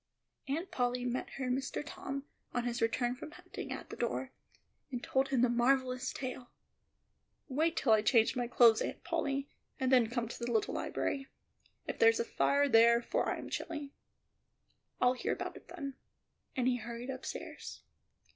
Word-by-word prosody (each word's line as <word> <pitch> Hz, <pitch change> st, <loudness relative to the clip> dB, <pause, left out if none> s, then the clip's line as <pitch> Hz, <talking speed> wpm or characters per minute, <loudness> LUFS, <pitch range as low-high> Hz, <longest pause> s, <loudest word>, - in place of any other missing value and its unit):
Aunt 325 Hz, +7 st, -2 dB
Polly 245 Hz, 0 st, 0 dB
met 250 Hz, +1 st, -2 dB
her 260 Hz, -2 st, -1 dB
Mr. 265 Hz, +3 st, -2 dB
Tom, 275 Hz, -1 st, -5 dB, 0.3 s
on 245 Hz, -, +1 dB
his 240 Hz, -1 st, -2 dB
return 240 Hz, +2 st, +1 dB
from 255 Hz, -, -8 dB
hunting, -, -, -8 dB
at -, -, -6 dB
the -, -, -5 dB
door, -, -, -2 dB, 0.6 s
and 245 Hz, -2 st, -4 dB
told 265 Hz, 0 st, +2 dB
him 265 Hz, -3 st, +2 dB
the 250 Hz, -, +6 dB
marvellous 255 Hz, +1 st, +2 dB
tale. 255 Hz, -2 st, -5 dB, 1.0 s
"Wait 310 Hz, +5 st, +1 dB
till 235 Hz, -, +3 dB
I 215 Hz, -, +5 dB
change 225 Hz, 0 st, +4 dB
my 245 Hz, -1 st, 0 dB
clothes, 235 Hz, -2 st, +6 dB
Aunt -, -, -3 dB
Polly, 285 Hz, -5 st, -1 dB, 0.3 s
and 260 Hz, 0 st, +1 dB
then 245 Hz, -4 st, +5 dB
come 240 Hz, -1 st, -1 dB
to -, -, -7 dB
the 240 Hz, 0 st, -2 dB
little 220 Hz, -2 st, +1 dB
library, 270 Hz, -1 st, -2 dB, 0.6 s
if -, -, -4 dB
there's 455 Hz, 0 st, +6 dB
a 465 Hz, -, +1 dB
fire 285 Hz, -9 st, +3 dB
there, 235 Hz, -1 st, +6 dB
for -, -, 0 dB
I -, -, -1 dB
am -, -, -8 dB
chilly; 295 Hz, -4 st, -4 dB, 1.1 s
I'll 250 Hz, 0 st, +5 dB
hear 255 Hz, -, -1 dB
all -, -, -7 dB
about -, -, -4 dB
it -, -, -16 dB
then;" 295 Hz, -6 st, -5 dB, 0.6 s
and 255 Hz, -2 st, +1 dB
he 250 Hz, -1 st, +3 dB
hurried 235 Hz, +2 st, -5 dB
upstairs. 260 Hz, 0 st, -7 dB
255 Hz, 175 wpm, -33 LUFS, 240-275 Hz, 1.1 s, the